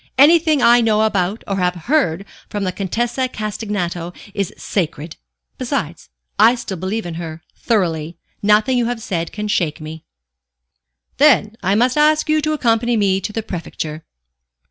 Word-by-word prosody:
"Anything 310 Hz, -1 st, +5 dB
I 240 Hz, +1 st, +6 dB
know 220 Hz, -1 st, +2 dB
about 205 Hz, -1 st, 0 dB
or 195 Hz, -, -1 dB
have 180 Hz, -1 st, +1 dB
heard 200 Hz, -, +1 dB, 0.2 s
from 205 Hz, -1 st, -3 dB
the 185 Hz, -, -1 dB
Contessa 235 Hz, +7 st, -1 dB
Castagneto 205 Hz, -6 st, -4 dB, 0.2 s
is 200 Hz, -3 st, -2 dB
sacred; 160 Hz, -4 st, -3 dB, 0.4 s
besides, 240 Hz, -, -3 dB, 0.3 s
I 225 Hz, +4 st, +6 dB
still 235 Hz, -6 st, -6 dB
believe 190 Hz, +5 st, -3 dB
in 175 Hz, -, -5 dB
her 160 Hz, -1 st, -7 dB
thoroughly. 170 Hz, -7 st, -1 dB, 0.2 s
Nothing 210 Hz, +5 st, +3 dB
you 235 Hz, -, +1 dB
have 240 Hz, -1 st, -2 dB
said 170 Hz, -3 st, -3 dB
can 210 Hz, 0 st, -4 dB
shake 170 Hz, -7 st, 0 dB
me." 155 Hz, +1 st, -8 dB, 1.1 s
"Then 240 Hz, -7 st, +4 dB
I 190 Hz, +1 st, +1 dB
must 250 Hz, +6 st, +2 dB
ask 305 Hz, +1 st, +3 dB
you 310 Hz, 0 st, +3 dB
to 310 Hz, +1 st, 0 dB
accompany 240 Hz, -4 st, +1 dB
me 195 Hz, -2 st, +2 dB
to 210 Hz, -, -4 dB
the 225 Hz, +1 st, -3 dB
Prefecture. 160 Hz, -4 st, -6 dB
210 Hz, 155 wpm, -19 LUFS, 175-240 Hz, 1.1 s, I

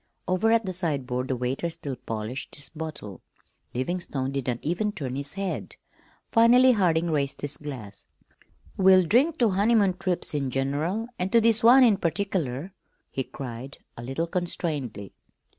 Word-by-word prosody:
Over 185 Hz, +5 st, +2 dB
at 230 Hz, -1 st, +3 dB
the 185 Hz, -, -3 dB
sideboard 135 Hz, -8 st, -2 dB
the 130 Hz, -, -1 dB
waiter 125 Hz, +7 st, -2 dB
still 140 Hz, -4 st, -6 dB
polished 115 Hz, +3 st, -5 dB
his 145 Hz, -, -8 dB
bottle. 150 Hz, -, -7 dB, 0.5 s
Livingstone 135 Hz, -1 st, -2 dB
did 135 Hz, -2 st, -3 dB
not 120 Hz, -2 st, 0 dB
even 185 Hz, +7 st, 0 dB
turn 135 Hz, -10 st, -5 dB
his 140 Hz, +1 st, -4 dB
head. 195 Hz, -1 st, -4 dB, 0.6 s
Finally 245 Hz, +3 st, +6 dB
Harding 170 Hz, -6 st, +2 dB
raised 140 Hz, -3 st, -1 dB
his 145 Hz, 0 st, -1 dB
glass. 125 Hz, -9 st, -9 dB, 0.7 s
"We'll 190 Hz, -1 st, +6 dB
drink 275 Hz, -, +3 dB
to 235 Hz, -5 st, +3 dB
honeymoon 200 Hz, -1 st, +3 dB
trips 180 Hz, -4 st, -1 dB
in 140 Hz, -3 st, -1 dB
general 145 Hz, -, -1 dB
and 185 Hz, +1 st, -1 dB
to 230 Hz, -, +6 dB
this 225 Hz, 0 st, +3 dB
one 255 Hz, +3 st, +8 dB
in 220 Hz, -5 st, +5 dB
particular," 175 Hz, -4 st, -2 dB, 0.4 s
he 135 Hz, -, -2 dB
cried, 130 Hz, +1 st, -8 dB, 0.2 s
a -, -, -8 dB
little 135 Hz, +7 st, -2 dB
constrainedly. 155 Hz, -, -3 dB
165 Hz, 155 wpm, -26 LUFS, 135-195 Hz, 0.7 s, one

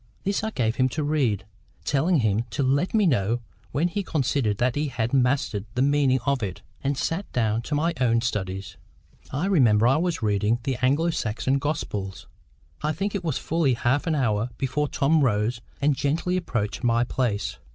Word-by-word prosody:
This 200 Hz, +1 st, 0 dB
I 220 Hz, -, 0 dB
gave 115 Hz, -, -1 dB
him 130 Hz, 0 st, +3 dB
to 155 Hz, -, +1 dB
read, 140 Hz, -9 st, 0 dB, 0.4 s
telling 150 Hz, +2 st, +2 dB
him 110 Hz, 0 st, +1 dB
to 140 Hz, -, -1 dB
let 140 Hz, +10 st, +1 dB
me 215 Hz, -2 st, +4 dB
know 120 Hz, -, +2 dB, 0.3 s
when 155 Hz, +5 st, +1 dB
he 190 Hz, +4 st, -2 dB
considered 135 Hz, -, 0 dB
that 120 Hz, +2 st, +1 dB
he 150 Hz, +1 st, 0 dB
had 120 Hz, -3 st, -2 dB
mastered 125 Hz, -5 st, +1 dB
the 125 Hz, -, +2 dB
meaning 140 Hz, -2 st, +3 dB
of 140 Hz, -2 st, +1 dB
it, 95 Hz, -4 st, -4 dB, 0.2 s
and 140 Hz, 0 st, 0 dB
sat 170 Hz, +8 st, -2 dB
down 110 Hz, -2 st, +1 dB
to 145 Hz, +5 st, -3 dB
my 165 Hz, +3 st, +1 dB
own 115 Hz, -2 st, +3 dB
studies. 95 Hz, -4 st, -3 dB, 0.5 s
I 145 Hz, +7 st, -2 dB
remember 120 Hz, -, +4 dB
I 135 Hz, +4 st, +4 dB
was 175 Hz, 0 st, 0 dB
then 110 Hz, -, +1 dB
reading 105 Hz, +3 st, +1 dB
the 135 Hz, -3 st, -1 dB
Anglo 145 Hz, +7 st, +2 dB
Saxon 130 Hz, 0 st, -1 dB
Gospels. 105 Hz, -10 st, -3 dB, 0.6 s
I 150 Hz, +1 st, 0 dB
think 195 Hz, +6 st, -2 dB
it 200 Hz, -3 st, -2 dB
was 155 Hz, -6 st, -1 dB
fully 155 Hz, -6 st, +1 dB
half 130 Hz, +7 st, 0 dB
an 160 Hz, -, +2 dB
hour 115 Hz, -4 st, +1 dB
before 140 Hz, +2 st, 0 dB
Tom 150 Hz, +3 st, +2 dB
rose 115 Hz, 0 st, +1 dB, 0.2 s
and 145 Hz, 0 st, +2 dB
gently 160 Hz, +7 st, 0 dB
approached 115 Hz, -, -2 dB
my 120 Hz, 0 st, +3 dB
place. 115 Hz, -, -2 dB
130 Hz, 190 wpm, -25 LUFS, 115-150 Hz, 0.6 s, me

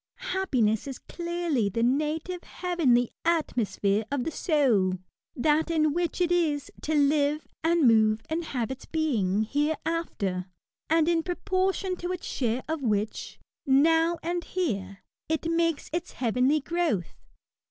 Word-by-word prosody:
Happiness 250 Hz, -, +1 dB
is 270 Hz, -2 st, -5 dB
clearly 340 Hz, -, -2 dB
the 230 Hz, +4 st, -1 dB
native, 305 Hz, +7 st, 0 dB
heavenly 285 Hz, -10 st, +1 dB
atmo 320 Hz, -9 st, +1 dB
sphere 200 Hz, +2 st, 0 dB
of 280 Hz, -3 st, -1 dB
the 325 Hz, -, -3 dB
soul 260 Hz, -, +2 dB, 0.2 s
— -, -, -57 dB
that 310 Hz, +2 st, +3 dB
in 310 Hz, -3 st, +2 dB
which 345 Hz, 0 st, -1 dB
it 350 Hz, -1 st, +2 dB
is 305 Hz, -5 st, +1 dB
" -, -, -19 dB
to 315 Hz, -, -1 dB
live 290 Hz, +1 st, +2 dB, 0.2 s
and 330 Hz, -4 st, +4 dB
move 220 Hz, -1 st, +4 dB
and 325 Hz, +1 st, -2 dB
have 250 Hz, -5 st, -2 dB
its 265 Hz, -, -8 dB
being 220 Hz, -, +1 dB
" 220 Hz, -, -9 dB
hereafter, 295 Hz, -, -1 dB, 0.4 s
and 325 Hz, 0 st, +3 dB
in 335 Hz, -1 st, +3 dB
pro 355 Hz, +2 st, -3 dB
portion 375 Hz, 0 st, 0 dB
to 355 Hz, +1 st, -4 dB
its 365 Hz, -1 st, -5 dB
share 245 Hz, -1 st, -1 dB
of 320 Hz, -1 st, -2 dB
which, 215 Hz, -3 st, -2 dB, 0.3 s
now 325 Hz, +5 st, +4 dB
and 345 Hz, +1 st, -2 dB
here, 200 Hz, -, -3 dB, 0.3 s
it 320 Hz, 0 st, -1 dB
makes 330 Hz, -2 st, 0 dB
its 340 Hz, -, -3 dB
heavenly 255 Hz, +5 st, +1 dB
growth. 320 Hz, -, -1 dB
305 Hz, 150 wpm, -27 LUFS, 240-335 Hz, 0.4 s, and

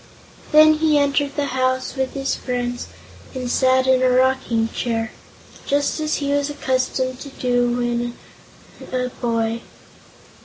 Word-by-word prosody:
Then 310 Hz, 0 st, +7 dB
he 310 Hz, -2 st, +3 dB
entered 285 Hz, 0 st, +1 dB
the 290 Hz, -, 0 dB
house 255 Hz, 0 st, 0 dB
with 265 Hz, -1 st, -2 dB
his 270 Hz, 0 st, -1 dB
friends 245 Hz, -1 st, -3 dB, 0.5 s
and 250 Hz, -1 st, -3 dB
sat 260 Hz, 0 st, +3 dB
in 260 Hz, -1 st, +3 dB
a 255 Hz, -, +4 dB
rocking 250 Hz, -3 st, +2 dB
chair 225 Hz, -2 st, -2 dB, 0.6 s
just 285 Hz, +2 st, +1 dB
as 310 Hz, 0 st, 0 dB
he 280 Hz, -1 st, -2 dB
was 285 Hz, 0 st, +1 dB
accustomed 255 Hz, -2 st, -1 dB
to 280 Hz, -, -8 dB
do 245 Hz, -2 st, 0 dB
when 240 Hz, 0 st, -2 dB, 0.7 s
a 250 Hz, 0 st, -1 dB
boy. 230 Hz, -2 st, -2 dB
255 Hz, 140 wpm, -21 LUFS, 245-280 Hz, 0.7 s, Then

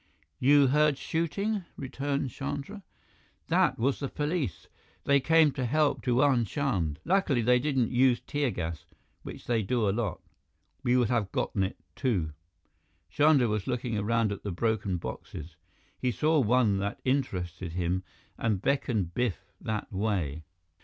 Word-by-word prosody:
"You 145 Hz, +2 st, +6 dB
heard 150 Hz, +1 st, +3 dB
shooting?" 190 Hz, +7 st, -1 dB
returned 140 Hz, 0 st, -2 dB
Chandra. 145 Hz, -, -5 dB, 0.7 s
"That -, -, +3 dB
was 130 Hz, +4 st, +1 dB
the 140 Hz, -, -3 dB
police. 150 Hz, -, -2 dB, 0.4 s
They 140 Hz, 0 st, +4 dB
came 160 Hz, +2 st, +4 dB
to 135 Hz, -1 st, -3 dB
help 150 Hz, +4 st, +1 dB
Diwan 125 Hz, -1 st, +3 dB
Chand. 95 Hz, -, -1 dB
Lucky 180 Hz, -7 st, +2 dB
they 125 Hz, +2 st, +4 dB
didn't 130 Hz, -4 st, 0 dB
use 125 Hz, 0 st, +4 dB
tear 145 Hz, -2 st, -1 dB
gas, 80 Hz, -7 st, -4 dB, 0.4 s
which -, -, -9 dB
they 115 Hz, -2 st, +1 dB
do 115 Hz, +1 st, 0 dB
a -, -, +3 dB
lot. 105 Hz, -4 st, -2 dB, 0.6 s
We 125 Hz, -2 st, +2 dB
would 120 Hz, -3 st, +2 dB
have 115 Hz, -5 st, 0 dB
gotten 100 Hz, -, -1 dB
it, 95 Hz, +1 st, -1 dB, 0.2 s
too." 95 Hz, -, 0 dB, 0.8 s
Chandra 145 Hz, -, +4 dB
was 105 Hz, -2 st, -2 dB
looking 120 Hz, -2 st, -2 dB
around 110 Hz, +1 st, +1 dB
at 100 Hz, -, -5 dB
the 105 Hz, -, -4 dB
broken 100 Hz, -1 st, 0 dB
boxes. 80 Hz, -1 st, -7 dB, 0.4 s
He 125 Hz, -, 0 dB
saw 155 Hz, +5 st, +2 dB
one 115 Hz, -4 st, +3 dB
that 100 Hz, +1 st, -3 dB
interested 90 Hz, -, -1 dB
him 90 Hz, +1 st, -1 dB, 0.4 s
and 110 Hz, -4 st, +1 dB
beckoned 110 Hz, -8 st, 0 dB
Biff 120 Hz, -5 st, -2 dB
that 110 Hz, -1 st, -4 dB
way. 90 Hz, -7 st, -1 dB
120 Hz, 145 wpm, -29 LUFS, 100-140 Hz, 0.8 s, You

